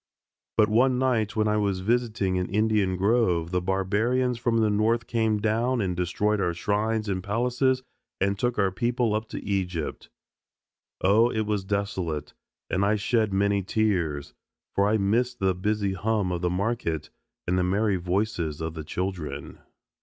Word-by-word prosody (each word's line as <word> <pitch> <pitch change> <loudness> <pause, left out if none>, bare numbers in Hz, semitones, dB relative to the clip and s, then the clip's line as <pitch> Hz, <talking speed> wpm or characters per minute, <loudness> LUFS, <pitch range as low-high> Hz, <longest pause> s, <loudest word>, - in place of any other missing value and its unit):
But 105 - +5
one 125 +4 +3
night 115 -5 +1
when 110 -1 +2
I 105 0 +2
was 100 -3 0
visiting 105 -4 0
an 90 - -3
Indian 105 -2 +2
grove 95 -5 +2
the 90 -1 +1
barbarians 110 +7 0
from 120 -1 +1
the 110 -2 +3
North 110 +3 +1
came 110 -2 +1
down 115 +4 +1
and 95 -4 -1
destroyed 100 +4 0
our 85 -2 0
shrines 105 +4 0
and 95 -2 -2
palaces 125 +5 +1 0.4
and 100 +1 0
took 120 -1 0
our 100 -2 +2
people 120 +2 0
up 110 +1 -2
to - - -6
Egypt. 90 -5 -3 0.9
Oh, 110 +5 +4
it 110 - -1
was 105 -2 -1
desolate, 95 -6 -2 0.3
and 95 - 0
I 105 +2 +3
shed 110 0 +1
many 100 +1 +2
tears, 90 -8 -1 0.4
for 100 +1 +2
I 110 - +3
missed 120 +5 +1
the 95 -4 +1
busy 100 +1 -1
hum 105 -1 0
of 85 -1 -2
the 90 - +1
market 90 -5 -2 0.3
and 90 - 0
the 90 - +2
merry 100 +2 +1
voices 90 -4 -1
of 80 0 -3
the 80 -1 -6
children. 90 0 -4
105 Hz, 165 wpm, -26 LUFS, 95-110 Hz, 0.9 s, But